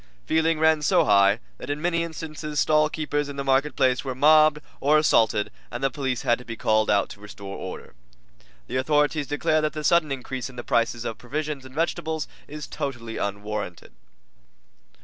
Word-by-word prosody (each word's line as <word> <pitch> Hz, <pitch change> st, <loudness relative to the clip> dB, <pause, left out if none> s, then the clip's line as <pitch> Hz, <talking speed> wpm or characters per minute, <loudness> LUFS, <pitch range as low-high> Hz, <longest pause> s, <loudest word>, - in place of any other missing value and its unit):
Feeling 160 Hz, 0 st, +2 dB
ran 160 Hz, 0 st, +3 dB
so 150 Hz, -, +3 dB
high 100 Hz, +1 st, +5 dB, 0.2 s
that -, -, -8 dB
in 145 Hz, +1 st, -2 dB
many 170 Hz, +1 st, 0 dB
instances 155 Hz, -2 st, -5 dB
stallkeepers 150 Hz, -1 st, +1 dB
in 140 Hz, -, -6 dB
the 140 Hz, -, -3 dB
markets 135 Hz, -2 st, +2 dB
were 130 Hz, -2 st, -4 dB
mobbed 155 Hz, +2 st, +6 dB, 0.2 s
or 150 Hz, +2 st, +4 dB
assaulted, 110 Hz, -8 st, +3 dB, 0.2 s
and 120 Hz, +2 st, -6 dB
the 135 Hz, -, +2 dB
police 130 Hz, -3 st, -2 dB
had 120 Hz, -, +2 dB
to -, -, -10 dB
be 115 Hz, -2 st, -7 dB
called 110 Hz, 0 st, +2 dB
out 100 Hz, -, +3 dB
to -, -, -11 dB
restore 100 Hz, -1 st, -9 dB
order. -, -, -8 dB, 0.7 s
The 130 Hz, -, -3 dB
authorities 150 Hz, +2 st, +1 dB
declare 145 Hz, +2 st, +1 dB
that 155 Hz, 0 st, -1 dB
the 155 Hz, -1 st, -5 dB
sudden 155 Hz, -1 st, +3 dB
increase 130 Hz, -1 st, -4 dB
in 130 Hz, -, -13 dB
the 120 Hz, -, -6 dB
prices 115 Hz, 0 st, 0 dB
of 115 Hz, -, -4 dB
provisions 145 Hz, +1 st, -4 dB
and 130 Hz, +1 st, -13 dB
vegetables 160 Hz, -1 st, -1 dB, 0.2 s
is 150 Hz, 0 st, -7 dB
totally 115 Hz, -5 st, -5 dB
unwarranted. 100 Hz, -2 st, -4 dB
140 Hz, 175 wpm, -25 LUFS, 120-155 Hz, 0.7 s, mobbed